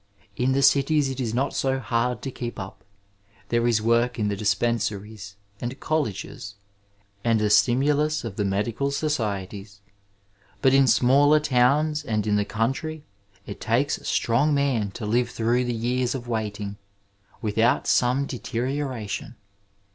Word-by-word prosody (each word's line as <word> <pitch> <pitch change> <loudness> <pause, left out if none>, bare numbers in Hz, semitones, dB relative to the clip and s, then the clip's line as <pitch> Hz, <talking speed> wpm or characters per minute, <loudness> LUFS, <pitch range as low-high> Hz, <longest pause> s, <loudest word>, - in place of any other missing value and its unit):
In 130 +2 +1
the 135 +1 +1
cities 140 +1 +3
it 135 - -6
is 120 -4 -1
not 130 +4 -1
so 135 0 0
hard 125 0 -1
to 135 - -4
keep 120 -1 -6
up: 95 -1 -8 0.7
there 120 0 +1
is 110 -3 +2
work 115 +1 +2
in 105 -2 0
the 100 - -1
dispensaries 105 -1 -2 0.2
and 125 +3 -5
colleges, 105 -8 -3 0.7
and 115 -2 +2
the 105 -1 +1
stimulus 145 +7 +3
of 115 -5 -6
the 105 - -1
medical 105 +7 -1
societies; 105 -9 -3 0.8
but 130 - +3
in 135 -1 +5
smaller 140 +5 +5
towns 150 +2 +2
and 110 -6 -1
in 105 -1 +1
the 105 0 +1
country 145 +8 -2 0.4
it 100 - -8
takes 120 +5 +1
a - - -19
strong 140 +6 +1
man 130 -7 +1
to 105 +3 -7
five 120 +3 +1
through 120 +2 0
the 120 - -1
years 125 +3 -1
of 125 -2 -6
waiting 105 -3 -3 0.7
without 110 +3 +2
some 125 +3 +2
deteriora 130 -1 -3
tion. 100 +6 -5
120 Hz, 150 wpm, -24 LUFS, 110-135 Hz, 0.8 s, in